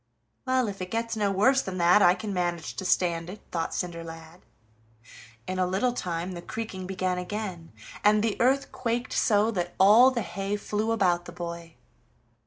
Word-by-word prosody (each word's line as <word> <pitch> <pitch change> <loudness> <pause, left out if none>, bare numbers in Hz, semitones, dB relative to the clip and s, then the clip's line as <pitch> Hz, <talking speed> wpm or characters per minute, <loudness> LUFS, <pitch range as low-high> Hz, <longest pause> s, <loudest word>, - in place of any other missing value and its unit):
"Well, 255 -2 +2
if 195 -2 -6
it 185 - -4
gets 230 +1 -2
no 210 -2 +1
worse 260 +8 +3
than 190 -5 -5
that, 180 +4 +5
I 175 -1 +6
can 200 +2 -5
manage 175 -2 -2
to 190 - -4
stand 170 -2 +1
it," 205 +3 -8
thought 165 -2 -1
Cinderlad. 165 -1 -6 1.0
In 185 0 -3
a 185 - +2
little 200 +7 0
time 175 -4 -3
the 175 -1 -7
creaking 190 -2 -6
began 185 -1 -1
again, 180 -3 -5 0.3
and 210 0 +4
the 225 -2 0
earth 265 +3 +2
quaked 240 0 -2
so 215 0 +3
that 175 -4 -3
all 215 +7 +8
the 240 -4 -2
hay 195 +3 -3
flew 210 +2 -2
about 180 -6 +1
the 175 - -9
boy. 170 -1 -7
190 Hz, 180 wpm, -27 LUFS, 175-220 Hz, 1.0 s, all